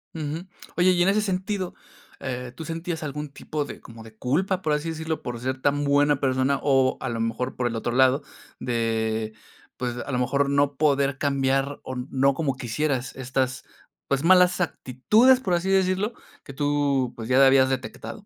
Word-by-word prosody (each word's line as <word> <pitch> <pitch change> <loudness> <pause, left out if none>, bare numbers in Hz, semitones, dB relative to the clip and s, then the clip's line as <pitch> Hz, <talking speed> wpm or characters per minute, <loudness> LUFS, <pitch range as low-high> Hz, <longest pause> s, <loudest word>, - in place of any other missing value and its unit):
Ujú. 160 +3 -4 0.3
Oye, 180 +1 +5
y 175 -1 +3
en 185 - +3
ese 210 +2 +2
sentido, 190 -1 -2 0.5
eh, 125 -2 -5
¿tú 160 - -7
sentías 165 +1 -4
algún 150 0 -5
tipo 145 +1 -4
de, - - -9
como 115 -1 -12
de 110 -1 -14
culpa, 180 - 0
por 155 -4 0
así 150 +2 -1
decirlo, 160 -1 -3
por 120 -1 -5
ser 130 +2 -3
tan 145 +1 +1
buena 145 0 +3
persona 130 +1 +1
o 135 -2 +3
a 130 - -2
lo 115 -1 -3
mejor 115 +3 -2
por 125 - 0
el 115 - -3
otro 115 +1 -2
lado, 130 +2 +4 0.4
de 110 -2 -1 0.4
pues, 125 -1 -3
a 140 - -5
lo 125 - 0
mejor 140 +3 +1
no 140 0 +2
poder 140 -2 +2
cambiar 135 0 0
o 130 - -6
no 135 +2 +1
como 135 -2 -1
quisieras, 130 +2 -2
estas, 130 0 -2 0.4
pues 140 +1 0
malas 180 +1 +5
actitudes, 210 - +3
por 190 -8 -1
así 175 +2 0
decirlo? 190 +3 +1 0.3
Que 140 - -10
tú, 140 -3 0
pues 115 -1 -7
ya 135 +2 +6
habías 135 0 +5
detectado. 135 - -5
140 Hz, 185 wpm, -25 LUFS, 130-160 Hz, 0.5 s, ya